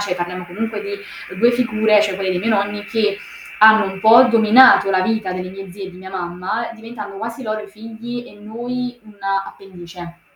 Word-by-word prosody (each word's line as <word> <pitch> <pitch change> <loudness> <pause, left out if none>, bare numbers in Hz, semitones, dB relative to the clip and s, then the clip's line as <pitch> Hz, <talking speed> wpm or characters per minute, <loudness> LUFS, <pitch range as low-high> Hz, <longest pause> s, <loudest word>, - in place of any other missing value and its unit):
cioè 205 -3 -2
parliamo 180 +1 -5
comunque 220 +3 -4
di 200 - -7 0.5
2 235 +4 +4
figure 220 -3 +2
cioè, 205 -2 -1
quelle 190 -1 -2
dei 180 - -1
miei 225 +4 -1
nonni 205 -1 -1
che 210 -3 -1 0.4
hanno 220 0 +7
un 190 - -10
po' 230 +4 +7
dominato 230 -2 +6
la 185 -1 +2
vita 220 -2 -1
delle 185 0 -5
mie 195 0 -10
zie 195 +1 -9
e 190 - -8
di 180 - -15
mia 190 0 -11
mamma, 185 +5 -4
diventando 220 -3 -9
quasi 230 +4 -6
loro 215 -1 -3
i 210 - -11
figli 225 +3 -8
e 250 - -15
noi 245 +3 -6
un'appendice 195 -4 -7
210 Hz, 190 wpm, -19 LUFS, 190-225 Hz, 0.5 s, hanno